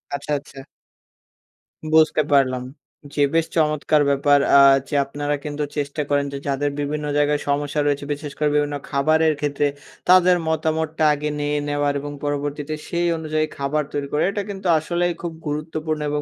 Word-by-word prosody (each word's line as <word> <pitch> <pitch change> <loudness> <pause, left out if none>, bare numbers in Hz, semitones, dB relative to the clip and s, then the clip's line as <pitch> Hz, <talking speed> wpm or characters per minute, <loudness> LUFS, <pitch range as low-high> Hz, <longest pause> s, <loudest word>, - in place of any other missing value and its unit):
আচ্ছা, 140 +2 -6
আচ্ছা। 135 -1 -12 1.3
বুঝতে 155 0 +4
পারলাম। 130 -2 +3 0.5
জি, 145 - 0
বেশ 165 -1 +3
চমৎকার 150 -1 +2
ব্যাপার 145 +1 +4 0.2
আ - - +8 0.3
যে 145 - -4
আপনারা 145 +1 -2
কিন্তু 150 0 -3
চেষ্টা 145 +1 -2
করেন 145 0 +2
যে, - - -3
যাদের 140 +1 0
বিভিন্ন 150 +1 -2
জায়গায় 145 0 +2
সমস্যা 145 +1 0
রয়েছে, 145 0 0
বিশেষ 145 0 -7
করে 150 -1 +1
বিভিন্ন 145 0 +1
খাবারের 155 +3 +2
ক্ষেত্রে 145 0 0 0.4
তাদের 180 -1 +6
মতামতটা 160 0 -1
আগে 150 +1 -3
নিয়ে 145 0 0
নেওয়ার 145 0 0
এবং 145 +1 -6
পরবর্তীতে 145 +1 -3
সেই 175 0 0
অনুযায়ী 155 -1 -1
খাবার 145 +2 0
তৈরি 140 -1 -2
করে, 150 - +2
এটা 205 - -2
কিন্তু 195 -2 -5
আসলেই 175 +2 -1
খুব 170 -1 -4 0.2
গুরুত্বপূর্ণ 155 +1 -3
এবং 150 0 -1
150 Hz, 160 wpm, -22 LUFS, 145-155 Hz, 1.3 s, আ